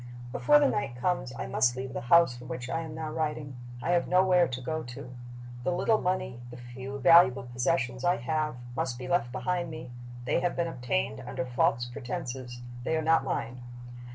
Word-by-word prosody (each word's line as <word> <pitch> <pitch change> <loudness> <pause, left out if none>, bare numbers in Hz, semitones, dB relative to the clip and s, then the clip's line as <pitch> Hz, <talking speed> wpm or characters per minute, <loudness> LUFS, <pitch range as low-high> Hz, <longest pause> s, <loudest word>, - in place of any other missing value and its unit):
"Before 295 - +5
the 295 - +4
night 140 - -1
comes 130 -1 -1
I - - -3
must 120 -1 +2
leave 130 0 -5
the - - -3
house 150 +1 +5
from 125 +1 -10
which 125 0 -5
I 165 - -1
am 160 -1 -7
now 160 -1 -4
writing. 150 -3 -3 0.3
I - - +1
have 175 -1 +2
nowhere 180 -1 +4
to 125 0 -4
go 155 +5 -3
to. 125 0 -9 0.5
The 180 - +1
little 215 +5 +2
money, 180 -9 -1
the 120 - -9
few 130 +2 -7
valuable 165 -3 +6
possessions 125 +1 -1
I 175 - +4
have, 155 +4 -1 0.2
must 125 -1 -2
be 125 0 -6
left 130 -5 +1
behind 175 +6 -1
me: 125 -6 -8 0.3
they - - +2
have 175 0 0
been 170 - +1
obtained 125 - -2
under 130 - -4
false 120 -1 +1
pretenses; 120 0 -6 0.2
they 160 +5 0
are 160 - -1
not 160 -2 +4
mine. 125 -2 -3
130 Hz, 195 wpm, -29 LUFS, 125-170 Hz, 0.5 s, valuable